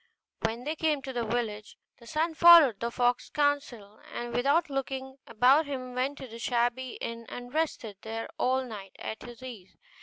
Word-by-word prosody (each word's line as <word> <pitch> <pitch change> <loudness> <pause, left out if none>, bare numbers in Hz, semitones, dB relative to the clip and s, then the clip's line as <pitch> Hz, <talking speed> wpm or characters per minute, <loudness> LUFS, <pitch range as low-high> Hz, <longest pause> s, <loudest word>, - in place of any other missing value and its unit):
When 230 +2 -2
they 305 +4 -2
came 305 -3 0
to 265 - -5
the 240 -1 -1
village, 220 -2 -3 0.2
the 235 - -16
son 320 +5 0
followed 320 -10 +8
the 235 - -1
fox's 245 +1 0
counsel, 280 -8 -1
and 240 0 -5
without 280 +7 +2
looking 265 -1 -4
about 260 +7 +4
him 255 -3 -5
went 260 +3 -1
to 265 - -8
the 230 0 -10
shabby 245 +1 0
inn 230 0 -6
and 245 +1 -8
rested 290 -10 -2
there 225 +1 -5
all 260 +1 +2
night 200 -5 -9
at 220 - -6
his 240 +1 -11
ease. 225 -8 -10
250 Hz, 180 wpm, -29 LUFS, 230-280 Hz, 0.2 s, followed